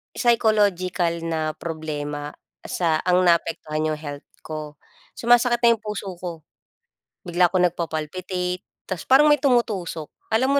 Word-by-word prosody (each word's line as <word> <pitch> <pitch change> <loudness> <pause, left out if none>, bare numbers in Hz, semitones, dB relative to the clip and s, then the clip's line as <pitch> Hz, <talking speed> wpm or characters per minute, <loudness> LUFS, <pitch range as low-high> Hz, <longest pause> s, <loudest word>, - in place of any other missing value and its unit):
psychological 205 -7 +2 0.2
na 160 -1 -1
problema 150 -2 -5 0.3
sa 165 -3 0
ang 180 0 +3
naapektuhan 155 -2 +1
yung 150 - -3
health 145 -2 -7 0.2
ko. 155 -1 -7 0.4
Sumasakit 240 0 +4
na 235 -1 +5
yung 220 - -21
puso 210 -2 -5
ko. 170 -2 -6 0.8
Bigla 175 0 +3
ako 180 +1 +1
nagpa-palpitate 180 +3 -3 0.2
tas 185 -3 -6
parang 295 +3 +6
may 295 - +4
tumutusok. 215 - 0 0.2
Alam 260 +5 +2
180 Hz, 125 wpm, -23 LUFS, 155-220 Hz, 0.8 s, parang